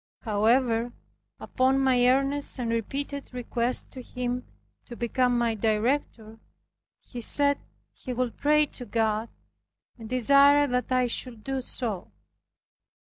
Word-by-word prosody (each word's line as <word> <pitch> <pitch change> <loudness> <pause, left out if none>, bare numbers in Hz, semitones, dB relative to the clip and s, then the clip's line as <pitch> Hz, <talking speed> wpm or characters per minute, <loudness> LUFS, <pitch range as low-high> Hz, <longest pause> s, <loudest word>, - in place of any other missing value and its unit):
However, 230 +2 +1 0.5
upon 260 +1 +1
my 255 -2 +3
earnest 275 +2 +1
and 240 -2 -2
repeated 275 +5 -4
request 245 0 -1
to 260 - -9
him 250 0 -4 0.4
to 240 - -10
become 245 +1 0
my 235 -1 +1
director, 220 +1 -1 0.6
he 245 - -9
said 285 +4 +2 0.3
he 255 - -8
would 250 -1 -2
pray 300 +1 +3
to 255 -3 -8
God 220 0 -1 0.7
and 220 -1 -9
desired 280 +3 +5
that 250 +1 -1
I 255 -1 +3
should 235 -2 -3
do 270 -1 -3
so. 225 -7 -4
250 Hz, 125 wpm, -26 LUFS, 230-270 Hz, 0.7 s, desired